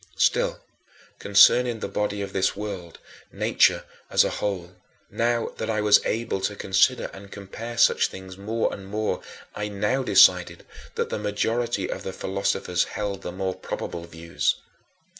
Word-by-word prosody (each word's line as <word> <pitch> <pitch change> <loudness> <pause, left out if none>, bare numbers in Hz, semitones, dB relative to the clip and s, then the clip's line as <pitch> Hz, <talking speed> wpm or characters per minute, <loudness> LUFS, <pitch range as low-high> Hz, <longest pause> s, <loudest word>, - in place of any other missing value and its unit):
Still, - - +2 0.6
concerning 115 +4 +5
the - - -3
body 105 -1 -2
of 100 - -7
this 95 0 +1
world, 100 -5 -6 0.3
nature - - +2 0.3
as - - +5
a - - -1
whole 90 -4 -3 0.4
now 115 0 0
that 110 - -4
I 110 -1 0
was 105 -1 +5
able 110 -3 -2
to 105 +2 -2
consider 100 +7 +2
and 100 0 -12
compare 115 +4 -8
such 115 - +4
things 95 -1 -10
more 110 +4 -2
and 95 -1 -9
more 105 +2 -2 0.3
I 105 - -3
now 105 +6 0
decided 90 -6 +4 0.3
that - - -1
the - - -2
majority 105 +1 -1
of - - -5
the 95 - -6
philosophers 95 -2 -1
held 100 -2 -4
the 90 - -5
more 95 +1 -2
probable 85 -1 -6
views. 85 0 -1
100 Hz, 155 wpm, -25 LUFS, 95-110 Hz, 0.6 s, concerning